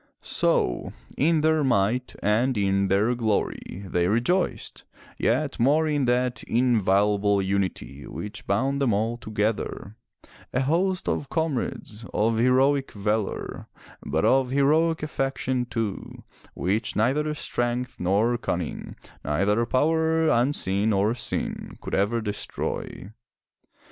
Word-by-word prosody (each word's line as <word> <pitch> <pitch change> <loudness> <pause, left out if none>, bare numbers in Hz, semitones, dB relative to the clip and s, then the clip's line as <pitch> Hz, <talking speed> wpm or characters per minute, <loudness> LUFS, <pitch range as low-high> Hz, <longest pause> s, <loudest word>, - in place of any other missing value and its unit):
So, - - 0 0.2
in 160 +2 +2
their 155 0 +3
might 120 0 +1
and 115 +5 +2
in 100 -1 +2
their 100 +5 +2
glory 110 -4 -2
they 90 -2 0
rejoiced, 120 - 0 0.4
yet - - 0
more 150 +6 +3
in 145 -3 +1
that 125 0 +1
inviolable 105 -4 +2
unity 95 -7 -2
which 105 0 -7
bound 135 +8 0
them 125 -6 +2
all 110 +4 0
together, 110 -2 -3 0.6
a 125 - +1
host 180 +7 0
of 140 - -1
comrades, 135 -8 -3
of 110 +1 +2
heroic 135 +3 +3
valor, 105 0 -2 0.4
but 80 +3 0
of 130 -1 +3
heroic 155 +4 +2
affection, 135 -3 -1
too, 115 -4 -4 0.3
which 105 +5 -1
neither 140 +8 +1
strength 120 -2 -2
nor 105 +7 +1
cunning, 85 -7 -4 0.3
neither 105 +10 +1
power, 160 +4 +2
unseen 115 -6 +1
nor 105 +1 +2
seen, 120 - -4
could - - -8
ever 105 +4 +1
destroy. 105 -2 -4
115 Hz, 115 wpm, -25 LUFS, 100-135 Hz, 0.6 s, their